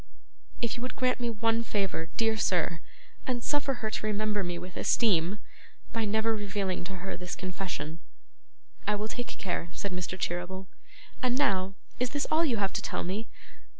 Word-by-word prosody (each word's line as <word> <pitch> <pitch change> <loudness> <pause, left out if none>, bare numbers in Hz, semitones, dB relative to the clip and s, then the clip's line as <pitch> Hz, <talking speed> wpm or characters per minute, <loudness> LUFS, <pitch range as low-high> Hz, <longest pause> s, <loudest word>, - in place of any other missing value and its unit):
'If 235 - +2
you 240 - -5
would 255 - -3
grant 255 0 +2
me 240 -1 +1
one 225 +1 +2
favour, 195 -7 0
dear 225 -1 +4
sir, 175 -5 +2 0.5
and 245 -2 0
suffer 285 -2 +2
her 215 - +1
to 215 - -1
remember 210 -1 +1
me 175 -1 -1
with 180 +1 -7
esteem, 190 -4 +4 0.6
by 225 -1 +1
never 220 +2 +3
revealing 200 -3 -1
to 190 +1 -4
her - - -2
this 180 -1 -4
confession 180 -4 -3 0.4
' - - -31
'I 210 - +4
will 210 +1 -1
take 245 +2 -3
care,' 175 -2 -2
said 200 - -3
Mr. 180 +1 -3
Cheeryble. 180 +3 -1 0.6
'And 255 -1 +3
now, 195 -9 +3 0.2
is 250 0 +2
this 285 +2 0
all 315 +2 +6
you 260 -8 +3
have 195 -2 +1
to - - 0
tell - - -1
me? 200 +6 -2
205 Hz, 185 wpm, -31 LUFS, 185-230 Hz, 0.6 s, all